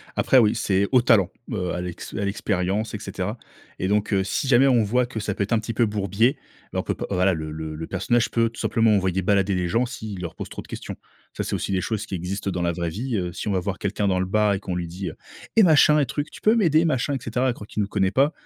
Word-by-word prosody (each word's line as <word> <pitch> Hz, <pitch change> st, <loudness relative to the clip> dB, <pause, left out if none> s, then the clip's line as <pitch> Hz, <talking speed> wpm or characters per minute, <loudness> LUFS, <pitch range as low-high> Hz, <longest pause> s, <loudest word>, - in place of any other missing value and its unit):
Après 115 Hz, +5 st, +3 dB
oui, 110 Hz, -4 st, +5 dB
c'est 100 Hz, -3 st, +1 dB
au 130 Hz, -2 st, +5 dB
talent, 115 Hz, -6 st, +4 dB, 0.2 s
heu, 90 Hz, -6 st, -2 dB
à 90 Hz, -, -3 dB
l'ex 90 Hz, -1 st, -7 dB
à 100 Hz, -, -2 dB
l'expérience 100 Hz, +1 st, -1 dB
et -, -, -4 dB
cetera -, -, -4 dB, 0.4 s
et 95 Hz, -, 0 dB
donc, 105 Hz, +2 st, +1 dB
heu, 95 Hz, -1 st, +3 dB
si 100 Hz, -, -2 dB
jamais 130 Hz, +1 st, +5 dB
on 120 Hz, -4 st, +4 dB
voit 120 Hz, +4 st, +1 dB
que 120 Hz, -3 st, -5 dB
ça 105 Hz, -1 st, -2 dB
peut 100 Hz, -, -1 dB
être 100 Hz, -, -6 dB
un 115 Hz, -, +3 dB
petit 115 Hz, +1 st, -5 dB
peu 115 Hz, +2 st, +3 dB
bourbier, 105 Hz, +4 st, +1 dB, 0.3 s
ben -, -, -2 dB
on -, -, -1 dB
peut -, -, -1 dB
pas -, -, -5 dB
voilà 95 Hz, 0 st, +2 dB
le 80 Hz, -2 st, -4 dB
le 80 Hz, 0 st, -5 dB
le 80 Hz, +1 st, -6 dB
personnage 115 Hz, +5 st, +1 dB
peut 115 Hz, -1 st, +2 dB
tout 115 Hz, -, -13 dB
simplement 110 Hz, 0 st, +3 dB
envoyer 95 Hz, -1 st, 0 dB
balader 100 Hz, 0 st, +2 dB
les 90 Hz, -1 st, 0 dB
gens 115 Hz, +8 st, +1 dB
s'ils 110 Hz, -5 st, -7 dB
leur 85 Hz, -2 st, -6 dB
posent -, -, -7 dB
trop -, -, -7 dB
de -, -, -16 dB
questions. -, -, -7 dB, 0.4 s
Ça, -, -, -2 dB
c'est -, -, -2 dB
aussi -, -, -3 dB
des 95 Hz, -1 st, +1 dB
choses 110 Hz, 0 st, -2 dB
qui -, -, -10 dB
existent 95 Hz, +3 st, -3 dB
dans 90 Hz, -1 st, -3 dB
la 85 Hz, -, +1 dB
vraie 85 Hz, 0 st, -2 dB
vie, 115 Hz, +6 st, -3 dB
heu. 90 Hz, -2 st, -3 dB
Si 95 Hz, -, -5 dB
on -, -, +1 dB
va 95 Hz, -, +2 dB
voir 95 Hz, +1 st, -4 dB
quelqu'un 100 Hz, 0 st, -1 dB
dans 95 Hz, -1 st, +1 dB
le 95 Hz, -, 0 dB
bar 105 Hz, +1 st, +2 dB
et 95 Hz, -, -1 dB
qu'on 95 Hz, -2 st, -4 dB
lui 90 Hz, -1 st, -3 dB
dit, 90 Hz, +3 st, -5 dB
heu: -, -, -10 dB, 0.4 s
«Et 225 Hz, -, +7 dB
machin 150 Hz, -3 st, +6 dB
et 145 Hz, -, +3 dB
truc, 145 Hz, +4 st, -4 dB
tu -, -, -12 dB
peux 215 Hz, +2 st, +4 dB
m'aider? 165 Hz, -7 st, +3 dB
Machin 140 Hz, -2 st, 0 dB
et -, -, 0 dB
cetera», 125 Hz, +3 st, -1 dB
à 125 Hz, -, +1 dB
croire 105 Hz, -3 st, -11 dB
qu'il 105 Hz, -, -3 dB
nous 100 Hz, -, 0 dB
connaît 95 Hz, -2 st, +1 dB
pas, 140 Hz, +6 st, +3 dB
105 Hz, 295 wpm, -24 LUFS, 95-120 Hz, 0.4 s, Et